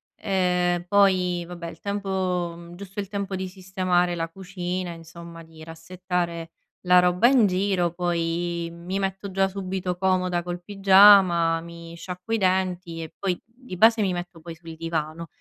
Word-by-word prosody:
Ehm, 180 -2 0
poi 185 -3 +2
vabbè 170 -1 -7
il - - -13
tempo 180 -4 -3
giusto 195 +2 -9
il 200 - -3
tempo 200 -1 -4
di 190 - -4
sistemare 185 -1 -1
la 165 -1 -2
cucina, 180 0 -5
insomma, 170 0 -11
di 160 -1 -14
rassettare 170 0 -4 0.3
la 180 0 +5
roba 180 +6 +4
in 250 -6 +5
giro, 185 -2 0
poi 170 -1 -2
mi 180 +3 -4
metto 195 0 -3
già 195 +1 +2
subito 190 -2 -4
comoda 185 -2 0
col 175 0 -5
pigiama, 190 -4 +5
mi 170 0 -11
sciacquo 180 +5 -7
i 225 - +3
denti 185 -3 -1
e 160 - -10
poi 185 -3 -2
di 235 -5 -11
base 225 +2 +5
mi 195 - +1
metto 175 -1 -6
poi 170 0 -8
sul 165 0 -11
divano. 165 0 -4
180 Hz, 155 wpm, -24 LUFS, 170-190 Hz, 0.3 s, la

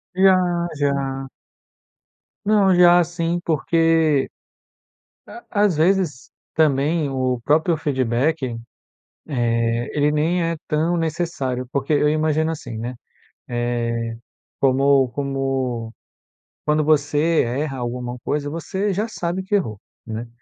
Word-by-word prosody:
Já, 190 0 +6 0.4
já. 135 -1 -1 1.2
Não, 200 -3 +4
já 175 0 +7
sim, 170 0 -2
porque 160 -2 +2 1.0
à 355 - -11 0.2
às 190 -5 +2
vezes, 165 -4 +1 0.2
também 150 0 +2
o 130 -2 -1
próprio 160 +3 +2
feedback, 130 -2 -1 0.7
eh, 115 -3 0
ele 145 +1 +3
nem 165 +4 +1
é 165 0 -1
tão 160 +3 +1
necessário. 160 -6 -2
Porque 140 +3 -1
eu 150 0 +3
imagino 155 +1 +1
assim, 130 -8 -6
né, 120 +3 -4 0.6
eh, 115 -1 -2 0.4
como 135 0 +4
como 135 -3 -2 0.7
quando 150 0 +2
você 150 +2 +2
erra 135 +3 -2
alguma 125 0 -4
coisa, 145 0 -2
você 190 +6 -2
já 210 +5 -1
sabe 180 -3 -3
que 190 +2 -3
errou, 110 - -3 0.3
né. 115 +1 -5
145 Hz, 110 wpm, -21 LUFS, 130-165 Hz, 1.2 s, já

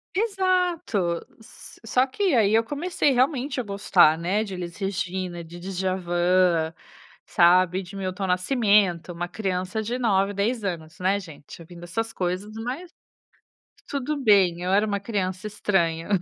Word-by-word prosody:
Exato, 360 - 0 0.7
só 255 +4 +2
que 370 +4 0
aí 215 -4 +4
eu 225 - +4
comecei 290 +3 0
realmente 260 +1 +1
a - - -1
gostar, 195 -6 +4
né, 190 +6 0
de 195 -3 -6
Elis 175 -1 -6
Regina, 185 -3 -3
de 170 +2 -11
Djavan, 180 -2 +1 0.5
sabe, 180 +1 +4
e - - -5
de 190 +3 -11
Milton 190 0 -3
Nascimento, 185 - +2
uma 175 +1 -4
criança 185 +1 -3
de 245 +4 -3
9, 200 -4 +2
10 215 +3 -1
anos, 165 -3 -5
né, 190 +2 +1
gente, 160 -2 -12
ouvindo 170 +1 -12
essas 225 +7 -3
coisas 185 +3 -3
mas, 260 +10 -5 1.0
tudo 285 +2 -2
bem, 190 -5 +4
eu 185 - -1
era 205 +2 +3
uma 200 -1 -2
criança 190 -2 -3
estranha. 170 -6 0
195 Hz, 145 wpm, -24 LUFS, 175-225 Hz, 1.0 s, aí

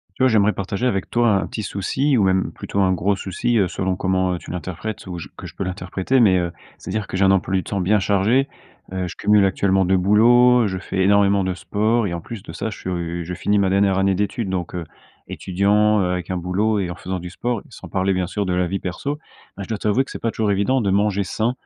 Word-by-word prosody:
Tu 130 - 0
vois, - - +6
j'aimerais 105 -3 +3
partager 100 +4 -3
avec 95 -7 -1
toi, 120 -1 +2
un - - -4
petit 110 - -5
souci 130 +9 0
ou 105 - +3
même 95 0 +1
plutôt, 100 - -3
un 95 -1 +3
gros 95 +2 +1
souci, 100 +5 -1
heu, 95 -4 +3
selon 95 +1 -1
comment, 95 0 0
heu, - - -2
tu - - -9
l'interprètes 90 +5 -6
ou 90 -1 -5
j 85 - -8
que - - -8
je - - -13
peux - - -3
l'interpréter 95 +6 -1
mais 100 -6 +5
heu, 85 -1 -1 0.3
c'est-à-dire 110 -2 -4
que - - -6
j'ai 95 - +2
un 95 - +5
emploi 95 0 +1
du 95 - +1
temps 100 - -3
bien 100 +4 +2
chargé. 105 +7 +2 0.4
Heu, 95 -1 -2
je - - -8
cumule 105 -1 +3
actuellement 95 0 +2
2 95 +1 +3
boulots. 120 +5 +5
Je 95 -1 -3
fais 95 +1 -6
énormément 100 0 +4
de 95 0 -1
sport 110 +5 0
et 85 - -4
en 85 - -4
plus 110 +2 -8
de - - -9
ça, 110 - -4
je 110 - -8
suis, - - -5
heu, 85 -1 -3
je 90 +2 -6
finis 105 +3 +1
ma 95 -1 +2
dernière 95 0 +2
année 95 0 +2
d'études 105 +2 -2
donc 90 -2 -3
heu, 90 - -3 0.4
étudiant, 105 +3 +2
heu, 90 -1 0
avec 90 -1 -3
un 95 - -1
boulot 100 +5 0
et 95 -3 -2
en 85 - -5
faisant 95 +1 -5
du 90 +1 -7
sport, 120 +3 -3
sans - - -11
parler, 95 +1 0
bien 90 -1 -1
sûr, 105 +1 -2
de 90 - -1
la 90 0 +1
vie 95 +3 -2
perso. 140 +11 -4 0.4
Ben, 100 - -6
je - - -11
dois 110 - -2
t'avouer 105 +6 +1
que - - -13
c'est - - -6
pas 115 - 0
toujours 110 -2 0
évident 100 +7 +1
de 100 - 0
manger 100 0 +1
sain. 110 +5 -1
95 Hz, 265 wpm, -21 LUFS, 95-105 Hz, 0.4 s, vois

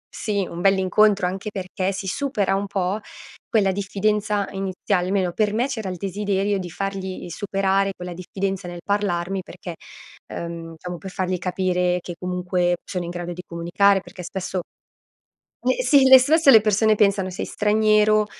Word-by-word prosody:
si 200 -3 -1
un 170 - -7
bell'incontro, 195 +1 +3
anche 190 +4 -4
perché 185 -1 -3
si 190 - -5
supera 205 -5 0
un 200 +1 -2
po' 195 +1 -1 0.5
quella 200 -4 +3
diffidenza 205 +1 0
iniziale, 190 -1 -1
almeno 185 -2 0
per 210 +1 +1
me 240 +5 +1
c'era 220 -8 -4
il 180 - -5
desiderio 200 +1 -1
di 180 - -5
fargli 190 0 -5
superare 195 +1 0
quella 180 0 -7
diffidenza 190 +1 -4
nel 175 -1 -7
parlarmi, 195 -2 -1
perché, 175 -1 -8 0.6
uhm, 170 -1 -6
diciamo 175 +2 -7
per 190 - -7
fargli 185 -1 -1
capire 180 0 0
che 175 - -7
comunque 180 -1 0
sono 180 -2 -4
in 170 - -5
grado 175 0 -5
di 180 - -8
comunicare, 180 +4 +2
perché 180 +1 -11
spesso 190 +1 -4 1.0
eh, - - +1
si 280 -3 +6
le 260 0 +10
spesso 305 +3 +3
le 225 -4 +9
persone 215 +1 +3
pensano 200 -2 +2
sei 180 - -4
straniero, 215 0 +3
195 Hz, 160 wpm, -23 LUFS, 180-205 Hz, 1.0 s, le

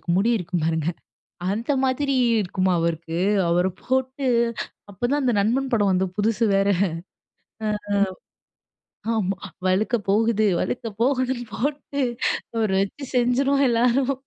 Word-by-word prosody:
அவருக்கு - - -32
முடி 215 +5 +3
இருக்கும் 175 -4 -2
பாருங்க. 160 -1 0 0.7
அந்த 230 +7 -1
மாதிரி 270 +1 +1 0.3
இருக்குமா 185 0 0
அவருக்கு 165 0 -2 0.3
அவரை 180 +2 +2
போட்டு 260 +1 -1 0.7
அப்பதான் 245 +9 -1
அந்த 250 -3 +2
நண்பன் 255 +6 +1
படம் 205 -3 +3
வந்த 185 +1 +2
புதுசு 225 +2 +1
வேற. 195 +1 +2 1.0
அ, - - 0 1.5
ஆமா. 195 -3 -1 0.3
வழுக்க 200 +6 +1
போவுது 220 +1 +3
வழுக்க 245 - -2 0.2
போவுதுன்னு 255 -1 +1
போட்டு 285 +1 -2 0.5
அவரை 220 -4 +1
வச்சு 200 +8 -5
செஞ்சுருவோம் 270 +3 +3
எல்லாரும். 245 +3 +2
230 Hz, 120 wpm, -23 LUFS, 190-260 Hz, 1.5 s, முடி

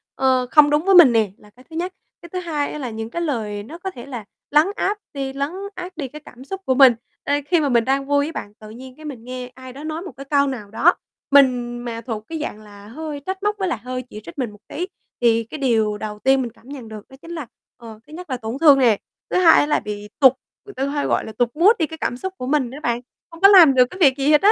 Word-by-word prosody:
ờ, 260 -1 +2
không 300 -1 +7
đúng 295 +4 +1
với 390 - +5
mình 335 -8 +9
nè, 220 -4 +2
là 210 - -19
cái 250 +5 -21
thứ 320 - -11
nhất. 360 +3 -3 0.3
Cái 340 - -12
thứ 365 +2 -4
hai 305 -5 -2
á 300 - -6
là 255 -4 -4
những 220 0 -6
cái 340 +8 -4
lời 215 -9 -3
nó 305 +10 -10
có 380 +2 -5
thể 240 -8 -10
là 245 -6 -7 0.3
lấn 300 +4 +5
áp 410 +2 -1 0.2
đi 270 -2 -4
lấn 280 +2 -2 0.3
át 365 0 -8
đi 285 -5 -3
cái 300 +4 -11
cảm 250 +1 -13
xúc 385 +7 -6
của 260 - +2
mình, 265 -2 +8 0.3
ơ, 285 - -1
khi 340 +2 +3
mà 295 -2 0
mình 235 -3 +3
đang 275 +1 0
vui 285 0 +2
á 315 - -5
bạn, 205 -7 -7
tự 215 - -12
nhiên 255 +3 -11
cái 310 - -13
mình 265 -7 -7
nghe 250 0 -6
ai 260 0 -11
đó 280 +3 -10
nói 310 +1 -4
một 370 - -8
cái 275 - -8
câu 280 0 +2
nào 225 -7 -6
đó, 345 +10 +4 0.4
mình 250 -3 +4
mà 230 -1 -5
thuộc 225 -3 -5
cái 325 -1 -5
dạng 215 -8 -5
là 205 -1 -14
hơi 295 +5 -6
trách 380 +1 -4
móc 415 0 +1
với 380 -2 -1
lại 250 - -2
hơi 255 0 -4
chỉ 215 - -9
trích 335 - -11
mình 250 -5 -2
một 210 - -16
tí, 355 +4 -4 0.3
thì 230 -1 +3
cái 230 +7 -9
điều 220 -6 +1
đầu 210 0 -6
tiên 265 +3 +3
mình 240 -2 -4
cảm 235 - -23
nhận 270 -4 -8
được 215 -1 -10
đó 265 - -14
chính 335 - -10
là, 320 -5 -5 0.3
ờ, 225 -2 -11
thứ 305 - -14
nhất 360 +1 -9
là 255 - -2
tổn 225 +2 -5
thương 290 -4 +7
nè, 235 -5 +4 0.3
thứ - - 0
hai 340 -3 +7
á - - +3
là 300 - +1
bị 210 0 -7
tụt 265 -3 +7 0.3
người 405 - -11
ta 270 - -2
hay 290 0 -1
gọi - - 0
là - - -7
tụt 245 -1 +2
mood 350 +7 +6
đi 320 - +2
cái 320 - -9
cảm 245 - -2
xúc 380 +8 -5
của 250 - -5
mình 275 -3 +1
đó 265 - -9
bạn, 240 0 0 0.3
hông 330 - -13
có 395 - +9
làm 360 -8 +8
được 250 -1 +6
cái 370 - -10
việc 275 -6 +5
gì 280 +2 +2
hết 300 - +5
á. 410 - +6
270 Hz, 295 wpm, -21 LUFS, 235-315 Hz, 0.4 s, mình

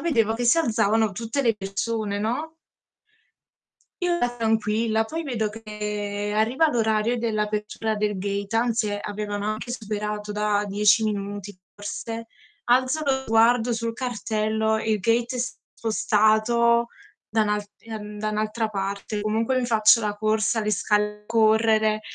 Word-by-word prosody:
vedevo 230 -10 +1
che 245 +2 -2
si 240 +8 +5
alzavano 220 -5 +2
tutte 230 +7 -2
le 230 -3 +3
persone, 205 +1 -2
no? 280 +10 -2 1.5
Io 355 - +1
ero 245 -5 -1
tranquilla, 220 0 +1
poi 325 +6 -4
vedo 230 -7 -1
che 210 -1 -4
arriva 250 +9 +3
l'orario 220 -1 +1
dell'apertura 215 -1 -2
del 210 -1 -1
gate, 200 +2 -3
anzi 225 -3 +1
avevano 205 0 -4
anche 220 +3 -6
superato 210 -2 -4
da 210 0 +1
10 205 +2 +4
minuti 205 -2 -4 0.2
forse. 225 +3 -6 0.4
Alzo 255 +5 +2
lo 280 - +2
sguardo 230 +1 +3
sul 230 0 -2
cartello, 220 -2 -1
il 220 -1 0
gate 235 +4 +1
è - - -2
spostato 235 0 +1 0.4
da 220 0 +1
un'al 210 -1 0
ehm, 210 -2 -8
da 215 0 -1
un'altra 215 +1 -1
parte. 200 +1 -3
Comunque 225 +4 0
mi 250 - -1
faccio 225 -1 +5
la 210 -1 -1
corsa, 215 +1 +1
le 210 - -1
scale 210 +1 0
correre. 220 -1 +3
220 Hz, 135 wpm, -24 LUFS, 210-230 Hz, 1.5 s, si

